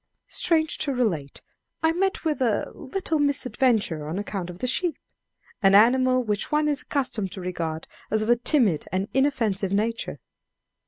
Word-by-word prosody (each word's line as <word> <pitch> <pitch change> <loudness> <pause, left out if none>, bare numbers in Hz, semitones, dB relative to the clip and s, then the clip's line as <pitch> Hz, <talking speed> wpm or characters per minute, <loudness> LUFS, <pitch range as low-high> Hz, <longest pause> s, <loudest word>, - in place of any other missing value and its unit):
Strange 320 -2 +1
to 290 - 0
relate, 185 - -2 0.4
I 320 - +4
met 375 +1 -1
with 300 -3 0
a 230 -5 0
little 315 +2 -2
misadventure 250 - +1
on 160 +4 -3
account 195 -3 -4
of 175 - -8
the 255 - -3
sheep 335 +7 0 0.6
an 195 0 +5
animal 255 +4 +5
which 210 +2 -2
one 300 0 +2
is 290 -1 0
accustomed 250 -9 -1
to 195 - -7
regard 165 -3 -4 0.2
as 215 0 +1
of 220 - -3
a 240 - +6
timid 240 - +2
and 190 +2 -1
inoffensive 225 -8 +1
nature. 225 +3 -1
235 Hz, 160 wpm, -25 LUFS, 195-285 Hz, 0.6 s, a